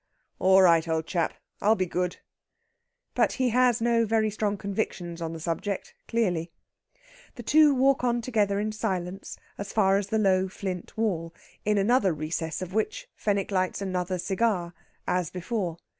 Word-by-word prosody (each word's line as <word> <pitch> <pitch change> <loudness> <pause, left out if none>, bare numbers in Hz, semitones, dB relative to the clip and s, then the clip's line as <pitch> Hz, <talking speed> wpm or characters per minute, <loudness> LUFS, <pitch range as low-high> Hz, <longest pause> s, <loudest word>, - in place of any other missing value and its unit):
"All 190 +1 +6
right, 165 -2 +5
old 160 -1 0
chap! 170 -2 -1 0.3
I'll 215 +2 +4
be 185 - 0
good." 180 0 -2 1.0
But - - +2
he 255 -2 +1
has 245 0 +3
no 235 0 +3
very 220 -1 +1
strong 205 -1 -1
convictions 185 -4 -3
on 165 -1 -3
the 165 - -6
subject, 170 +4 -3
clearly. 180 -8 0 0.8
The 240 - -8
two 295 +3 +5
walk 265 0 +3
on 240 -1 +2
together 210 -4 +1
in 215 +1 -1
silence 190 -2 -4 0.2
as 200 0 -5
far 195 -2 +3
as 200 -1 -2
the 220 - 0
low 190 -3 +3
flint 185 -1 -6
wall, 170 -7 -1 0.3
in 210 0 +2
another 200 -2 +3
recess 160 +2 -3
of 185 0 -8
which - - -2
Fenwick 200 -1 -1
lights 185 -1 0
another 185 -1 -2
cigar, 190 -2 0 0.3
as 180 -3 0
before. 180 -2 -3
195 Hz, 160 wpm, -27 LUFS, 180-220 Hz, 1.0 s, All